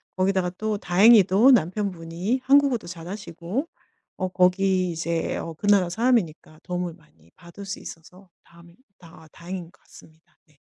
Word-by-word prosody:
거기다가 185 -1 0
또 215 -1 -2
다행히도 205 +5 +5
남편분이 185 +1 -1
한국어도 275 -6 +3
잘하시고 180 - -6 0.5
어 185 - -2
거기 185 0 +2
이제 165 0 -3
어 165 - -6
그 205 +6 -6
나라 195 -4 +4
사람이니까 180 -8 -1
도움을 180 -1 -4
많이 85 - -26
받을 170 +3 -13
수 195 - -5
있어서 180 +4 -13
다음에 170 0 -19 0.2
다 165 -2 -16
다행인 175 0 -8
것 165 - -22
같습니다. 160 +1 -20
네. 150 -2 -30
180 Hz, 330 characters per minute, -24 LUFS, 170-205 Hz, 0.5 s, 다행히도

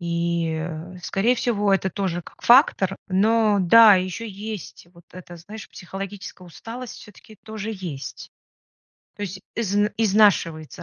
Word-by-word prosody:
И, 170 -1 -2 0.3
скорее 205 +7 +1
всего, 210 -4 0
это 190 0 +1
тоже 180 -2 -3
как - - -17
фактор. 215 -7 +4
Но 210 +2 +2
да, 215 +4 +8
еще 185 +5 -3
есть 205 -3 -8
вот 170 -1 -19
это 175 -1 -11
знаешь, 210 +6 -11
психологическая 195 0 -9
усталость, 230 +7 -9
все-таки 210 +1 -15
тоже 220 0 -6
есть. 175 -9 -8 0.9
То 205 - -7
есть 190 -1 -6
из 205 -4 -2 0.2
изнашивается 190 -6 +2
195 Hz, 130 wpm, -23 LUFS, 175-215 Hz, 0.9 s, да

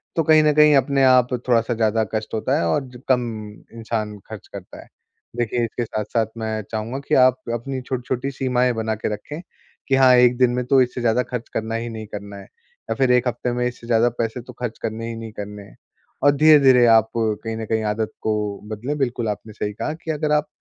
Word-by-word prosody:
तो 165 - +2
कहीं 155 0 +5
न 150 -1 +3
कहीं 150 0 +6
अपने 135 +1 +2
आप 125 -1 +4 0.2
थोड़ा-सा 115 0 +2
ज़्यादा 110 0 +1
कष्ट 110 0 -4
होता 110 - 0
है 85 - 0
और 110 - +1
ज 125 - -12
कम 125 -2 +3 0.5
इंसान 110 -2 -3
खर्च 110 -2 -9
करता 100 -2 -9
है। - - -17 0.5
देखिए, 120 0 0
इसके 115 +1 -4
साथ-साथ 110 +1 -1
मैं 110 -1 -3
चाहूँगा 115 +4 -3
कि - - +2
आप 130 -1 +3 0.2
अपनी 130 +3 -4
छोटी-छोटी 125 +1 -3
सीमाएँ 125 -2 +1
बना 110 -1 -2
के 110 - -3
रखें, 145 +10 -7 0.5
कि, 135 - +3
हाँ, 130 -1 +6
1 125 0 +5
दिन 125 -1 +4
में 125 0 -2
तो 130 +1 +4
इससे 125 0 -1
ज़्यादा 120 +1 +2
खर्च 120 -2 -4
करना 110 +1 -2
ही 115 +1 -3
नहीं 110 -1 -7
करना 100 -1 -8
है। 100 - -10
या 480 +1 -10
फिर, 130 -2 +2
1 125 0 +2
हफ़्ते 120 +1 -3
में 125 0 -1
इससे 120 -1 -8
ज़्यादा 120 0 +3
पैसे 115 +1 -2
तो 125 +1 -12
खर्च 120 -2 -4
करने 115 +1 -3
ही 115 - -5
नहीं 115 -1 -8
करने 105 -1 -7
हैं। 100 - -17 0.5
और 145 - +6
धीरे-धीरे, 140 -4 +6
आप 110 -1 +5
कहीं 110 0 -2
न 110 - -4
कहीं 110 0 -1
आदत 110 0 -3
को 110 - 0 0.4
बदलें। 120 +8 -4
बिल्कुल, 120 -4 -1
आपने 105 +1 -6
सही 105 0 -4
कहा 150 +8 -3
कि 160 0 -5
अगर 150 0 -2
आप 150 0 +1
120 Hz, 220 wpm, -21 LUFS, 110-130 Hz, 0.5 s, कहीं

